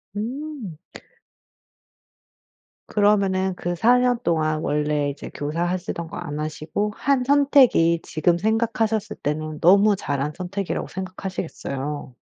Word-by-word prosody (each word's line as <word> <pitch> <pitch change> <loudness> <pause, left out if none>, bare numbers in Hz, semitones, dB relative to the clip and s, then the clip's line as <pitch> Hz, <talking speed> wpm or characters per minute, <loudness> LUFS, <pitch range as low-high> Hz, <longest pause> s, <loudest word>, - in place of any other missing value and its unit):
음. 245 - -5 2.1
그러면은 195 -3 +2
그 175 0 -3
4 240 +8 +4
년 250 -1 +2
동안 155 -4 +1
원래 150 -1 0
이제 140 +1 -7
교사 150 +4 -2
하시던 175 -2 -3
거 - - -8
안 145 +1 -5
하시고 155 +7 -3
한 275 -2 +2
선택이 265 - +4
지금 170 +2 +1
생각하셨을 220 +1 0
때는 155 +1 -2
너무 200 +4 +6
잘한 145 -3 -2
선택이라고 185 +1 -3
생각하시겠어요. 165 -7 -5
185 Hz, 255 characters per minute, -23 LUFS, 155-215 Hz, 2.1 s, 너무